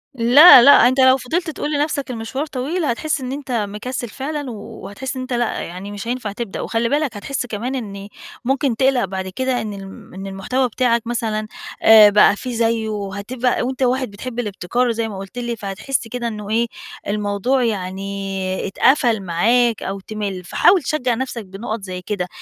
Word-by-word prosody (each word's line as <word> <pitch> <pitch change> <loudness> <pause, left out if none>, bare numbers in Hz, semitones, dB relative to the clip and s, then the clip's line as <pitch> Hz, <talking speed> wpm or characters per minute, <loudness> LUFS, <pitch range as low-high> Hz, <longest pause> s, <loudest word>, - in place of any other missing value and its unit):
لا، 255 +5 +9
لأ 280 - +8 0.2
أنت 260 +2 +1
لو 260 0 +6
فضلت 320 +7 -2
تقول 300 0 -4
لنَفْسك 290 -2 -1
المشوار 240 +5 -4
طويل، 305 +5 -3
هتحِس 300 +4 -1
إن 255 0 -4
أنت 275 -1 -6
مكسِّل 230 +2 -3
فعلًا 285 +3 -5
وهتحِس 215 +4 -7
إن 260 - -4
أنت 255 0 -5
لأ، 240 -1 -1
يعني 185 +4 -7
مش 205 +2 -7
هينفع 240 -4 -3
تبدأ 205 -1 -5
وخلِّ 230 0 -1
بالك 285 -5 0
هتحِس 260 +5 -3
كمان 240 +3 -4
إن 200 -5 -6 0.4
ممكن 270 -1 +1
تقْلَق 260 -2 +2
بعد 190 0 -5
كده 255 +6 -1
إن 215 -1 -5
الم 195 -1 -11
إن 195 +1 -7
المحتوى 225 +7 -1
بتاعك 235 -1 0
مثلًا 220 -2 -2 0.3
آآ 220 -1 +8
بقى 205 0 +5
في 250 +4 -6
زيّه 225 -1 0
وهتبقى 210 +5 -2
وأنت 260 +2 -2
واحد 255 -2 0
بتحب 235 +4 -6
الابتكار 220 +2 -1
وزي 230 -1 -1
ما 200 - -7
قُلت 195 +5 -9
لي، 240 -1 -3
فهتحِس 210 +5 -3
كده 240 +1 -4
إنه 210 -2 -6
إيه، 230 +2 +1 0.4
الموضوع 210 +5 0
يعني 195 -2 -3
اتقفل 240 0 +2
معاك 225 +7 +2
أو 195 +1 -4
تمِل. 200 -2 -5
فحاول 355 - +4
تشجّع 255 -2 0
نَفْسك 245 -3 -4
بنُقَط 210 +3 -5
زي 185 -1 -6
كده، 180 -1 -3
230 Hz, 175 wpm, -20 LUFS, 200-255 Hz, 0.4 s, لا